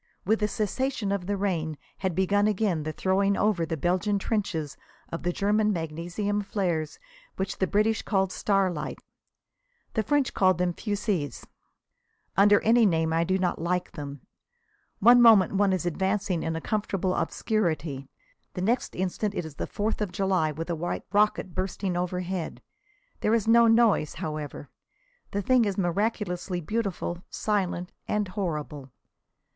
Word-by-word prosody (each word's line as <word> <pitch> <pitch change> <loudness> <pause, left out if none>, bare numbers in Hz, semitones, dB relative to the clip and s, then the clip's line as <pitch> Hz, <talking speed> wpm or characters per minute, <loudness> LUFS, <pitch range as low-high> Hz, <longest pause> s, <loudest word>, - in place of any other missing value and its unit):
With 220 +4 +2
the 210 - +1
cessation 220 +1 -1
of 195 -3 -2
the 205 0 0
rain 165 -6 -1 0.2
had 190 -3 -1
begun 200 +3 +2
again 200 -5 +1
the 155 +1 -3
throwing 195 +4 +1
over 200 -6 +1
the 160 - -2
Belgian 185 +6 +1
trenches 185 -8 -2 0.3
of 165 - -5
the 175 - 0
German 210 +3 +2
magnesium 175 +5 -2
flares, 175 -6 -2 0.4
which 190 +1 -3
the 190 - +2
British 215 +3 +2
call 195 -2 +1
starlights. 190 -5 -1 0.9
The 220 - +1
French 285 +3 +1
call 185 -1 +4
them 180 0 0
fusées. 200 - -2 0.9
Under 205 +1 +6
any 230 +2 +4
name 160 -5 +2
I 165 +1 +2
do 185 +2 +1
not 180 -3 -1
like 180 +1 -1
them. 145 -2 -7 0.8
One 240 +4 +7
moment 220 -6 +7
one 200 0 +3
is 185 -2 -1
advancing 190 +1 0
in 160 0 -2
a 165 - -3
comfortable 195 -3 -1
obscurity. 160 - -1 0.5
The 180 - -3
next 235 +5 0
instant 190 +3 -2
it 175 - -2
is 160 - -8
the - - -4
Fourth 215 +1 -2
of 205 -4 -1
July, 185 -6 +1
with 165 +3 -5
a - - 0
white 175 +2 -3
rocket 205 -3 +2
bursting 185 0 -2
overhead. 180 0 -3 0.6
There 220 - +2
is 225 -2 0
no 235 0 +6
noise, 225 -8 +3
however. 150 -2 -5 0.6
The 200 0 -2
thing 255 +3 +4
is 200 -3 -1
miraculously 185 -1 -1
beautiful, 185 -2 -3
silent 185 -4 -1 0.2
and 210 -2 0
horrible. 150 -7 -4
190 Hz, 150 wpm, -27 LUFS, 170-210 Hz, 0.9 s, One